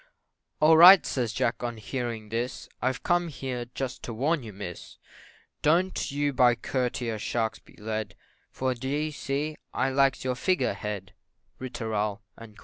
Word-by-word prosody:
"All 160 +1 +6
right!" 180 +2 +10
says 120 -5 -1
Jack 115 - -1
on 120 -1 -3
hearing 115 -1 -4
this, 120 +3 -3
"I've 130 +1 -1
come 175 0 +2
here 130 -5 -4
just 135 -2 -4
to 115 - -6
warn 145 +6 +1
you, 110 -3 -8
Miss, 95 -3 -8 0.6
Don't 175 +5 +2
you 145 0 0
by 125 -2 +5
courtier 120 -2 -2
sharks 110 +1 -1
be - - -21
led 110 0 -4 0.3
For, 130 0 -1
d'ye 140 +5 -2
see, 145 +2 -3 0.2
I 135 - +1
likes 135 -1 +2
your 130 -1 0
Figure 180 +8 +1
Head 100 -2 -6 0.5
Ri 130 - -5
tooral, 110 -3 -2 0.2
&c. 110 -2 -13
125 Hz, 155 wpm, -27 LUFS, 110-140 Hz, 0.6 s, right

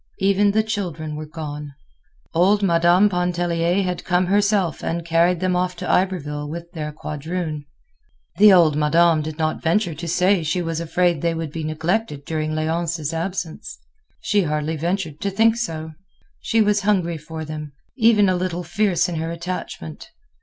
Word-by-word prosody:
Even 200 +1 +3
the 215 +2 +2
children 175 -8 -4
were 155 0 -6
gone. 150 -2 -7 0.6
Old 195 +5 +3
Madame 175 +2 +4
Pontellier 175 0 0
had 180 -1 -3
come 180 0 +1
herself 200 -3 +1
and 165 0 -2
carried 170 +1 +2
them 185 -1 +1
off 180 0 0
to - - -6
Iberville 150 -6 0
with 170 +2 -7
their 155 -4 -5
quadroon. 155 +1 -5 0.7
The 210 0 +8
old 170 -5 +5
madame 160 +2 +3
did 155 0 -6
not 155 -1 -1
venture 175 +1 +1
to 165 +3 -7
say 180 +3 +2
she 155 +3 -1
was 165 -2 -2
afraid 170 -1 +1
they 170 -1 0
would 160 -2 -4
be 160 0 -5
neglected 155 0 -2
during 155 -1 -2
Léonce's 160 0 -2
absence; 170 0 -4 0.4
she 205 -1 +1
hardly 150 -1 -1
ventured 165 -1 -3
to 200 - 0
think 225 +3 +3
so. 160 -9 -4 0.5
She 225 -1 +2
was 210 0 +2
hungry 180 -5 +1
for 160 +1 -7
them—even 165 - +1
a 185 - +2
little 180 -1 -2
fierce 175 0 +1
in 175 -2 -4
her 160 +1 -2
attachment. 170 - -6
170 Hz, 160 wpm, -22 LUFS, 155-185 Hz, 0.7 s, The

